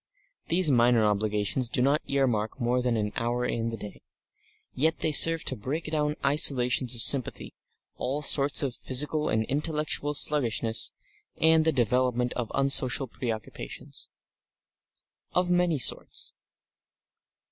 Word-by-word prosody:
These 170 Hz, -2 st, +2 dB
minor 120 Hz, -2 st, +3 dB
obligations 105 Hz, +3 st, -1 dB
do -, -, -1 dB
not 140 Hz, +5 st, +1 dB
earmark 125 Hz, -5 st, -1 dB
more 125 Hz, +1 st, 0 dB
than 125 Hz, -2 st, -1 dB
an 105 Hz, -1 st, -2 dB
hour 120 Hz, +1 st, -2 dB
in 115 Hz, -1 st, -3 dB
the 115 Hz, -, -6 dB
day. 105 Hz, -1 st, -11 dB, 0.7 s
Yet 160 Hz, +5 st, -1 dB
they 160 Hz, -, 0 dB
serve 165 Hz, +2 st, +4 dB
to 130 Hz, -, -3 dB
break 135 Hz, +9 st, -5 dB
down 150 Hz, -1 st, -1 dB
isolations 130 Hz, -3 st, +3 dB
of 115 Hz, -, +3 dB
sympathy, 135 Hz, -4 st, +2 dB, 0.4 s
all 140 Hz, +4 st, -3 dB
sorts 140 Hz, 0 st, +4 dB
of 135 Hz, -3 st, -2 dB
physical 150 Hz, +5 st, -1 dB
and 110 Hz, 0 st, 0 dB
intellectual 150 Hz, +1 st, -2 dB
sluggishness 115 Hz, -6 st, 0 dB, 0.5 s
and 160 Hz, 0 st, +3 dB
the 160 Hz, -, +3 dB
development 125 Hz, -1 st, 0 dB
of 120 Hz, -3 st, -5 dB
unsocial 135 Hz, -1 st, +3 dB
preoccupations 110 Hz, -, -7 dB, 1.2 s
of 180 Hz, 0 st, 0 dB
many 175 Hz, -3 st, +1 dB
sorts. 125 Hz, -, 0 dB
130 Hz, 130 wpm, -26 LUFS, 115-150 Hz, 1.2 s, serve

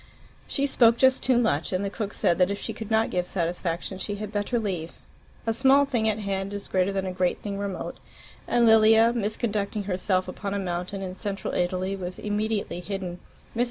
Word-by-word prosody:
She 280 Hz, -, +1 dB
spoke 235 Hz, -4 st, +4 dB
just 260 Hz, 0 st, +4 dB
too 255 Hz, -2 st, +3 dB
much, 220 Hz, -11 st, +1 dB
and 185 Hz, +2 st, 0 dB
the 195 Hz, -, -3 dB
cook 210 Hz, -1 st, -4 dB
said 170 Hz, -, +2 dB
that 180 Hz, +1 st, +4 dB
if 200 Hz, 0 st, -2 dB
she -, -, -4 dB
could 220 Hz, -2 st, -7 dB
not 220 Hz, 0 st, +2 dB
give 180 Hz, 0 st, -1 dB
satisfaction 175 Hz, +1 st, -2 dB
she 205 Hz, -, -2 dB
had 210 Hz, 0 st, -6 dB
better 210 Hz, +3 st, -1 dB
leave. 185 Hz, -7 st, -3 dB, 0.5 s
A 225 Hz, -, +1 dB
small 270 Hz, +4 st, +5 dB
thing 235 Hz, -5 st, +1 dB
at 215 Hz, -, 0 dB
hand 200 Hz, -1 st, -3 dB
is 200 Hz, -, -5 dB
greater 185 Hz, +1 st, +1 dB
than 195 Hz, -1 st, -2 dB
a 185 Hz, -, -2 dB
great 180 Hz, -1 st, -1 dB
thing 200 Hz, -1 st, -4 dB
remote, 200 Hz, -2 st, -4 dB, 0.5 s
and 240 Hz, -1 st, +3 dB
Lilia, 225 Hz, +1 st, +6 dB
misconducting 210 Hz, -2 st, -2 dB
herself 185 Hz, -1 st, 0 dB
upon 200 Hz, +2 st, -4 dB
a -, -, 0 dB
mountain 185 Hz, +1 st, -3 dB
in 185 Hz, -1 st, -4 dB
Central 200 Hz, +1 st, -4 dB
Italy, 185 Hz, +2 st, 0 dB
was 180 Hz, -1 st, -6 dB
immediately 210 Hz, -2 st, -2 dB
hidden. 180 Hz, -1 st, -5 dB, 0.4 s
Mrs. -, -, -4 dB
200 Hz, 200 wpm, -26 LUFS, 185-220 Hz, 0.5 s, Lilia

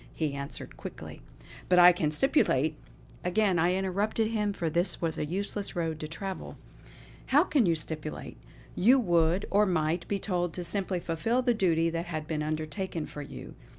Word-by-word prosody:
He 155 Hz, -3 st, -1 dB
answered 140 Hz, 0 st, -7 dB
quickly: -, -, -9 dB, 0.5 s
"But 180 Hz, -, +5 dB
I 180 Hz, 0 st, +10 dB
can 165 Hz, -3 st, 0 dB
stipulate 155 Hz, -, +2 dB, 0.3 s
" -, -, -24 dB
again 185 Hz, 0 st, +2 dB
I 175 Hz, +3 st, +3 dB
interrupted 200 Hz, +4 st, 0 dB
him 210 Hz, -2 st, 0 dB
for 175 Hz, -4 st, -3 dB
this 170 Hz, +4 st, +1 dB
was 165 Hz, -2 st, -2 dB
a 150 Hz, -, -2 dB
useless 200 Hz, +3 st, -3 dB
road 165 Hz, -2 st, -2 dB
to 155 Hz, -, -5 dB
travel; 190 Hz, +4 st, -6 dB, 0.7 s
"How 290 Hz, +4 st, +5 dB
can 285 Hz, -, +2 dB
you 165 Hz, -, +3 dB
stipulate? 155 Hz, -1 st, -5 dB, 0.4 s
You 245 Hz, +8 st, +5 dB
would, 175 Hz, -4 st, +2 dB
or 205 Hz, +1 st, +4 dB
might, 170 Hz, -1 st, 0 dB
be 200 Hz, -, 0 dB
told 175 Hz, -4 st, -1 dB
to 180 Hz, -, -5 dB
simply 185 Hz, +1 st, -1 dB
fulfill 225 Hz, +10 st, 0 dB
the 245 Hz, -1 st, +3 dB
duty 165 Hz, -6 st, +2 dB
that 165 Hz, +1 st, -3 dB
had 155 Hz, -3 st, -4 dB
been 155 Hz, -1 st, -2 dB
undertaken 155 Hz, +3 st, -3 dB
for 145 Hz, -, -8 dB
you. 140 Hz, -, -9 dB
175 Hz, 180 wpm, -29 LUFS, 160-200 Hz, 0.7 s, I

